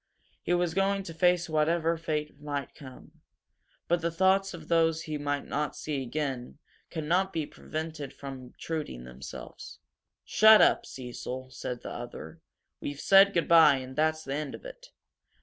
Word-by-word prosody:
He 175 - +1
was 175 -2 0
going 195 +1 +1
to 165 - -8
face 175 +1 +2
whatever 165 +1 +1
fate 150 -3 -3
might 145 -2 -4
come, 130 -3 -14 0.7
but 175 +1 +2
thoughts 190 +4 +2
of 160 -3 -10
those 165 -1 +2
he 155 -1 -4
might 145 0 -2
not 150 +1 -2
see 145 -3 -3
again 130 -2 -4 0.3
could 160 -2 -4
not 185 +5 +1
be 160 -4 -2
prevented 155 -2 -6
from 135 -2 -8
obtruding 150 - -5
themselves. 65 +1 -10 0.5
"Shut 220 0 +7
up, - - +4
Cecil," 130 0 -7
said 125 -2 -6
the - - -6
other. 120 -9 -8 0.4
"We've 145 0 -5
said 195 +3 +6
good 170 -3 0
bye 150 -6 +6
that's 155 +2 +1
the 135 - -4
end 150 0 -3
of - - -14
it! - - -10
155 Hz, 155 wpm, -29 LUFS, 140-170 Hz, 0.7 s, Shut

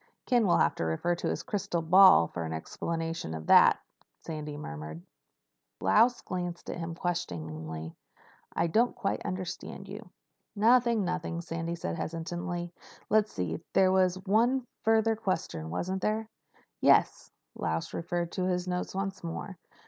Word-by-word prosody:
"Ken 240 -4 +3
will 175 - +4
have - - +3
to - - -4
refer 80 - 0
to 170 - -3
his - - -2
crystal 195 -8 -2
ball 185 - +8
for 85 +1 -5
an 80 0 -4
explanation 165 - -4
of 80 0 -7
that," - - +7 0.5
Sandy 150 -2 -5
murmured. 75 - -7 0.8
Lausch 230 - +4
glanced 175 -2 -4
at - - -6
him 165 0 -4
questioningly. 80 - -4 0.6
"I 165 - +2
didn't 225 +9 +2
quite 195 - -2
understand 185 -2 -5
you." - - -9 0.5
"Nothing—nothing," 215 -7 +2
Sandy 165 0 -4
said 85 - -4
hastily. 175 +1 -4 0.4
"Let's 215 0 +3
see. 85 -3 -3
There 190 -1 +5
was 185 -1 +3
one 235 +6 +2 0.2
further 225 0 +3
question, 185 - -3
wasn't 185 - -2
there?" 215 +2 0 0.5
"Yes," - - +3 0.2
Lausch 80 0 -3
referred 170 0 -2
to 185 - -2
his 180 0 -1
notes 180 +1 -3
once 195 -1 -3
more. 170 +3 -5
175 Hz, 140 wpm, -29 LUFS, 150-195 Hz, 0.8 s, ball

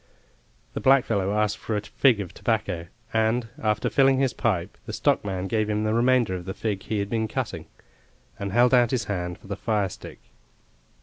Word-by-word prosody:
The - - -4
blackfellow 115 -8 +3
asked 105 0 0
for 110 - -2
a - - -2
fig 115 +2 +2
of 90 -3 -7
tobacco, 100 -7 -2 0.3
and, 115 +1 +1
after 105 -1 +1
filling 135 -1 +4
his 130 -2 +1
pipe, 95 -6 -1
the - - -5
stockman 95 -2 0
gave 110 +2 0
him 105 0 0
the 110 0 0
remainder 120 -3 +3
of 90 -1 -5
the 95 - -5
fig 105 -4 -2
he 110 - -3
had 100 0 -1
been 110 -1 0
cutting, - - -4 0.7
and 100 -1 -3
held 120 +4 +4
out 120 -2 +5
his 125 -3 0
hand 90 -4 -3
for - - -20
the 100 0 -4
firestick. 105 -2 -3
110 Hz, 185 wpm, -25 LUFS, 100-115 Hz, 0.7 s, out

